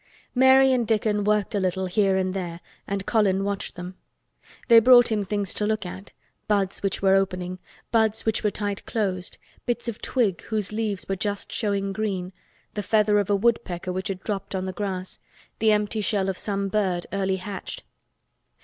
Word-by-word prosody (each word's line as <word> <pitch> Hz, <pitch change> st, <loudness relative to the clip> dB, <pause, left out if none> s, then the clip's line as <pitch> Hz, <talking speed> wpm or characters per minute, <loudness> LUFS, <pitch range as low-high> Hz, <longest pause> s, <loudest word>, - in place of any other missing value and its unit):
Mary 265 Hz, +1 st, +6 dB
and 240 Hz, -3 st, +1 dB
Dickon 210 Hz, -2 st, +1 dB
worked 210 Hz, 0 st, +1 dB
a 205 Hz, -, +1 dB
little 190 Hz, 0 st, 0 dB
here 190 Hz, +1 st, +2 dB
and 185 Hz, -1 st, 0 dB
there 175 Hz, -3 st, -4 dB, 0.3 s
and 200 Hz, -1 st, -3 dB
Colin 195 Hz, -4 st, +2 dB
watched 200 Hz, 0 st, -3 dB
them. 180 Hz, +1 st, -7 dB, 0.7 s
They 230 Hz, -2 st, +9 dB
brought 245 Hz, 0 st, +7 dB
him 210 Hz, -2 st, +1 dB
things 200 Hz, 0 st, -2 dB
to 210 Hz, -, -1 dB
look 215 Hz, -2 st, -1 dB
at—buds 195 Hz, +1 st, -4 dB
which 195 Hz, 0 st, -2 dB
were 190 Hz, 0 st, +5 dB
opening, 185 Hz, -1 st, 0 dB, 0.3 s
buds 220 Hz, -1 st, +2 dB
which 220 Hz, 0 st, 0 dB
were 210 Hz, -, +3 dB
tight 205 Hz, -1 st, -4 dB
closed, 190 Hz, -5 st, -2 dB, 0.3 s
bits 240 Hz, -1 st, -1 dB
of 235 Hz, -1 st, -4 dB
twig 220 Hz, -8 st, 0 dB
whose 215 Hz, -3 st, -2 dB
leaves 210 Hz, -3 st, -2 dB
were 195 Hz, -, -1 dB
just 205 Hz, +1 st, -3 dB
showing 200 Hz, -3 st, -1 dB
green, 190 Hz, -3 st, -3 dB, 0.4 s
the 210 Hz, -, -2 dB
feather 210 Hz, 0 st, +3 dB
of 205 Hz, -, -1 dB
a 205 Hz, -, +4 dB
woodpecker 195 Hz, -4 st, 0 dB
which 190 Hz, +3 st, -3 dB
had 190 Hz, -2 st, -5 dB
dropped 200 Hz, -2 st, -3 dB
on 185 Hz, 0 st, -2 dB
the 185 Hz, -, -4 dB
grass, 190 Hz, -1 st, -4 dB, 0.4 s
the 220 Hz, 0 st, +4 dB
empty 210 Hz, +1 st, +1 dB
shell 195 Hz, -2 st, 0 dB
of 190 Hz, -, -3 dB
some 200 Hz, -1 st, -1 dB
bird 190 Hz, -4 st, 0 dB
early 190 Hz, -1 st, 0 dB
hatched. 195 Hz, +1 st, -7 dB
200 Hz, 180 wpm, -25 LUFS, 190-215 Hz, 0.7 s, They